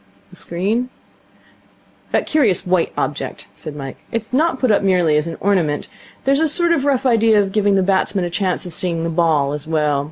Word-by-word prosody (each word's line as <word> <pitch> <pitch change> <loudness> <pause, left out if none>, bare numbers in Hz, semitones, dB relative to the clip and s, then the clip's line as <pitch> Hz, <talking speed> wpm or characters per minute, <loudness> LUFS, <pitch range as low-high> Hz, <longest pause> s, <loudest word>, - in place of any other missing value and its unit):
'The - - -14
screen?' 205 +9 -2 1.2
'That - - +1
curious 250 - +1
white 180 -2 +1
object,' - - -4
said 150 - -9
Mike. 135 -2 -7
'It 230 - 0
is 220 - -23
not 305 +1 +2
put 255 -4 +2
up 205 - +3
merely 180 -5 +2
as 150 +2 +1
an 165 - -6
ornament. 175 -7 0 0.4
There's 275 +1 +2
a 320 - +3
sort 340 +3 +3
of 285 -5 +1
rough 270 -2 +1
idea 225 -3 +4
of 195 -1 0
giving 205 -1 +2
the 190 - +2
batsman 190 0 +1
a 175 - -5
chance 185 0 -1
of 175 - -6
seeing 170 -1 -1
the 165 - -2
ball, 160 -4 +1
as 150 +1 -6
well. 150 -3 +1
190 Hz, 210 wpm, -19 LUFS, 165-230 Hz, 1.2 s, idea